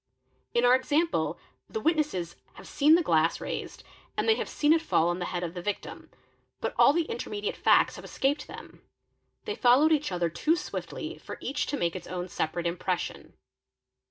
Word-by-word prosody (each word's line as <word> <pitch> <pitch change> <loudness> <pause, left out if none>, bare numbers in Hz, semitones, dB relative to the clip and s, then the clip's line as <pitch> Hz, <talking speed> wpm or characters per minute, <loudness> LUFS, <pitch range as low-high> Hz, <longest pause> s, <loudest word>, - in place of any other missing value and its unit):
In 240 +1 +4
our 245 - +6
example 295 +6 +1 0.3
the 440 - -3
witnesses 300 - 0 0.2
have - - -13
seen 300 +2 +5
the 345 - +2
glass 165 - +2
raised - - -6 0.3
and - - 0
they 445 - +6
have - - -3
seen 295 +1 +3
it 325 - +2
fall 170 - +2
on 175 +1 -2
the 180 - -2
head 175 0 -3
of 170 -1 -4
the 180 - -6
victim 205 +3 -5 0.5
but - - -2
all - - +8
the 335 +3 +1
intermediate 210 -7 -4
facts - - +3
have - - -10
escaped 285 +2 -1
them; - - -11 0.6
they 425 - -2
followed 275 - +4
each 300 -7 +1
other 175 -1 0
too 310 - +1
swiftly 315 - -6
for - - -8
each 290 +2 -2
to 290 - -2
make 170 -5 -1
its 180 - -7
own 180 0 -5
separate 170 +1 -2
impression. 175 +1 -3
245 Hz, 185 wpm, -28 LUFS, -, 0.6 s, all